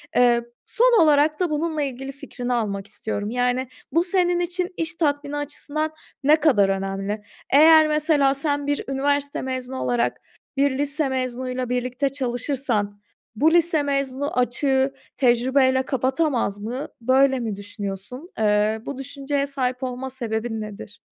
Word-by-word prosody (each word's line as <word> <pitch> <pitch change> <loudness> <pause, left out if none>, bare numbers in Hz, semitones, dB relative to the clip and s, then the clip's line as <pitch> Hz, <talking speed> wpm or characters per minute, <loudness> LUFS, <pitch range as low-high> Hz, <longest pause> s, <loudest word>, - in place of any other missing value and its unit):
Eee, 240 -1 +5 0.2
son 480 -2 +4
olarak 300 0 +4
da 360 -2 +1
bununla 310 0 -1
ilgili 270 -1 -4
fikrini 250 -2 -5
almak 200 -4 -2
istiyorum. 205 0 -4
Yani, 250 +1 0 0.2
bu 335 +2 +3
senin 355 -1 +2
için 360 +1 -2
iş 325 0 -2
tatmini 290 -2 -1
açısından 300 +1 -3 0.3
ne 295 +3 +6
kadar 240 -11 +4
önemli? 195 +2 -2 0.3
Eğer 315 +2 +8
mesela 300 -2 +3
sen 285 0 -1
bir 290 0 0
üniversite 285 +1 0
mezunu 260 0 -4
olarak, 240 -1 0 0.4
bir 275 -1 +2
lise 290 +1 0
mezunuyla 255 -1 -3
birlikte 250 +2 -1
çalışırsan 245 -5 -2 0.3
bu 310 +9 +4
lise 335 -3 +3
mezunu 275 -1 -2
açığı 265 +2 +1 0.2
tecrübeyle 260 +1 +3
kapatamaz 260 -4 0
mı? 240 +7 -4
Böyle 265 +2 +3
mi 225 -4 -3
düşünüyorsun? 205 - -7
Eee, 215 +1 +2
bu 280 - -5
düşünceye 275 +1 -2
sahip 255 -2 -2
olma 255 +1 -4
sebebin 225 -3 -3
nedir? 210 -1 -8
265 Hz, 135 wpm, -23 LUFS, 240-290 Hz, 0.4 s, Eğer